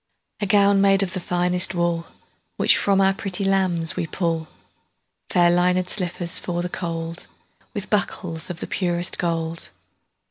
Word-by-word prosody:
A 205 - -1
gown 200 0 +4
made 195 0 +5
of 185 -2 -4
the 185 - -2
finest 180 +1 +1
woolWhich 170 -1 0
from 195 -1 +2
our 195 0 +4
pretty 195 0 -3
lambs 185 -4 +1
we 165 - -2
pull, 165 -2 -2 0.8
Fair 175 -1 +4
linèd 180 +1 +2
slippers 180 -2 -2
for 175 -1 -3
the 180 - -3
cold, 165 -1 -5 0.5
With 205 0 -5
buckles 180 -5 -1
of 180 -1 -6
the - - -3
purest 175 -2 -1
gold. 165 -1 -2
180 Hz, 145 wpm, -23 LUFS, 170-195 Hz, 0.8 s, made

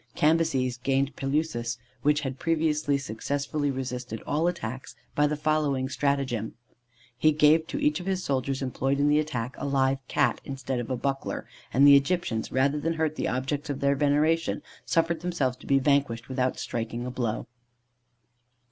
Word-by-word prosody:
Cambyses 150 -6 +2
gained 135 +2 0
Pelusis, 135 -4 -1 0.2
which 150 0 +3
had 135 -2 -4
previously 155 -3 +1
successfully 140 +4 -2
resisted 125 -3 -4
all 155 +4 +1
attacks, 130 -7 -4 0.2
by 150 0 +3
the 150 - -1
following 150 -3 +1
stratagem: 135 -6 -1 0.6
He 155 +6 +4
gave 155 +2 +4
to 285 - -4
each 295 -4 +2
of 180 - -8
his 190 -1 -1
soldiers 135 0 -1
employed 135 +1 -1
in 145 +1 +3
the 150 +1 +4
attack 125 -5 -3
a - - -3
live 135 -1 +2
Cat, - - +1
instead 135 -2 -3
of 120 - -5
a 130 - -1
buckler, 135 +2 -2 0.3
and 135 +3 +5
the 140 0 +9
Egyptians, 140 -6 +1
rather 140 +3 +2
than 165 +3 0
hurt 160 -1 0
the - - -1
objects 140 +4 -2
of 140 -1 -2
their 140 0 +3
veneration, 150 +4 +1 0.2
suffered 165 0 +1
themselves 170 -8 0
to - - -15
be 140 - +4
vanquished 135 -4 +1
without 130 -1 0
striking 115 +1 -4
a 125 - -4
blow. 120 -3 -2
140 Hz, 165 wpm, -27 LUFS, 130-155 Hz, 0.6 s, the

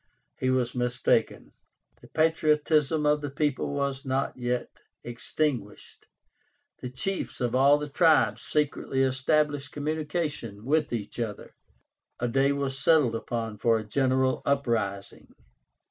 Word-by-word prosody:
He 130 - 0
was 125 -2 +1
mistaken. 125 -1 0 0.5
The - - -14
patriotism 155 -1 +2
of 150 0 +3
the 145 - -4
people 145 0 -1
was 140 -1 -2
not 135 0 -1
yet 125 0 -2 0.3
extinguished. 120 -2 -4 0.7
The 125 - -5
chiefs 160 +10 -3
of 120 -2 -1
all 140 +3 +5
the 150 0 -4
tribes 140 - +3
secretly 140 -3 0
established 140 +2 +1
communication 145 - -3
with 155 +4 +1
each 115 -1 -5
other. 110 -3 -5 0.7
A 120 - 0
day 135 +3 +2
was 140 -1 -2
settled 150 -7 +4
upon 115 -2 -4
for 115 +1 +3
a 110 - -4
general 130 +2 +1
uprising. 115 -8 -2
135 Hz, 125 wpm, -27 LUFS, 120-150 Hz, 0.7 s, all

